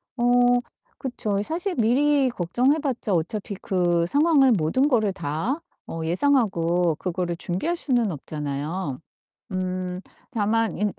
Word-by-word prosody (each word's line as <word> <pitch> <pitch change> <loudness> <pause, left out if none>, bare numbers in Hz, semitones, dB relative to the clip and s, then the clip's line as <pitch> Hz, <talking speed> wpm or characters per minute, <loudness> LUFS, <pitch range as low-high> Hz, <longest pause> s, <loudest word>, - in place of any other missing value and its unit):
어 240 - -2 0.7
그쵸. 225 -6 -2
이 205 - -1
사실 350 - -1
미리 270 +4 +3
걱정해 245 - +1
봤자 250 -8 -2
어차피 195 +5 -2
그 175 -3 +1
상황을 285 - +4
모든 215 - +2
거를 220 -8 +2
다 180 - -2 0.3
어 165 0 -4
예상하고 175 - +2
그거를 175 0 -3
준비할 195 - -2
수는 245 - +1
없잖아요. 150 0 -4 0.5
음 185 0 -3 0.3
다만 225 -3 0
인 210 0 0
200 Hz, 250 characters per minute, -24 LUFS, 175-260 Hz, 0.7 s, 상황을